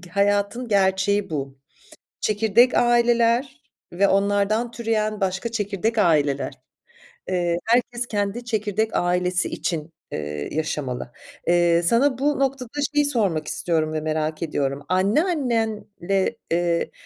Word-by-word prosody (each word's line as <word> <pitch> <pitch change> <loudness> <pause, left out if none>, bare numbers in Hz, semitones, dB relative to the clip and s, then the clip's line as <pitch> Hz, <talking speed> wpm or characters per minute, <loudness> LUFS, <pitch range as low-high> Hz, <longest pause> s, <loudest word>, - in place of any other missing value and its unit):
G 180 -2 -14
hayatın 205 +5 0
gerçeği 195 0 +2
bu. 135 -3 -4 0.6
Çekirdek 220 +3 +3
aileler 240 +3 +2 0.3
ve 195 +3 +3
onlardan 205 +4 +1
türeyen 215 -3 -1
başka 190 +4 -1
çekirdek 215 +1 -2
aileler. 150 -8 +2 0.8
Eee, 175 -2 0
herkes 240 +1 +1
kendi 205 +3 -2
çekirdek 220 -1 -1
ailesi 180 +1 +1
için, 165 -2 -4 0.2
eee, 75 - -5
yaşamalı. 140 -6 -3 0.4
Eee, 175 0 +4
sana 240 +8 +3
bu 285 +1 0
noktada 270 -3 -1 0.2
şeyi 295 -1 +3
sormak 195 - 0
istiyorum 160 -2 -1
ve 155 - -2
merak 155 0 -2
ediyorum. 140 -3 -2
Anneannenle, 220 - 0
eee, 170 0 0
200 Hz, 115 wpm, -23 LUFS, 170-235 Hz, 0.8 s, Eee